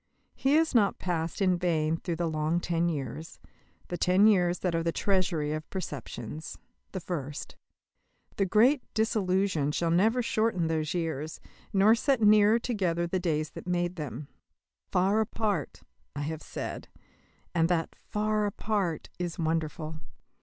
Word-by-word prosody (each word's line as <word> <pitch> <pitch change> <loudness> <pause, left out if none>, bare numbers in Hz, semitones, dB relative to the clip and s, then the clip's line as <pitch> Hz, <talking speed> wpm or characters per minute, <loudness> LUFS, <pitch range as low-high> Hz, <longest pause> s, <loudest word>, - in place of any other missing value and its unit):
He 270 +1 +1
has 320 -1 +3
not 210 -5 +3
passed 170 +1 -2
in 180 -2 +3
vain 160 -3 +1
through 170 +1 -3
the 170 +1 -1
long 155 +1 0
ten 170 0 0
years, 150 +1 -5 0.5
the 175 - -4
ten 185 +3 +4
years 180 -4 +3
that 180 -2 0
are 165 - +1
the 165 0 0
treasury 175 -6 0
of 155 0 -5
preceptions 150 - -6 0.3
the 190 - -4
first. 150 -5 -5 0.8
The 195 - +2
great 245 +8 +4
disillusion 190 -8 +1
shall 165 +2 0
never 220 +8 +3
shorten 215 -6 +1
those 160 0 -1
years, 160 -2 -3 0.3
nor 205 +2 +5
set 265 +2 +2
nearer 210 0 +6
together 185 -8 -1
the 185 +2 -1
days 155 -3 -1
that - - -9
made 175 0 0
them. 145 -3 -6 0.6
"Far 195 +4 +3
apart," 215 -2 -2 0.3
I 145 - -3
have 155 +1 -4
said, - - -6 0.7
and 165 -1 +2
that 170 -2 0
"far 215 0 -1
apart" 200 -5 -2
is 175 -2 -3
wonderful. 160 -1 -2
175 Hz, 145 wpm, -29 LUFS, 160-205 Hz, 0.8 s, nearer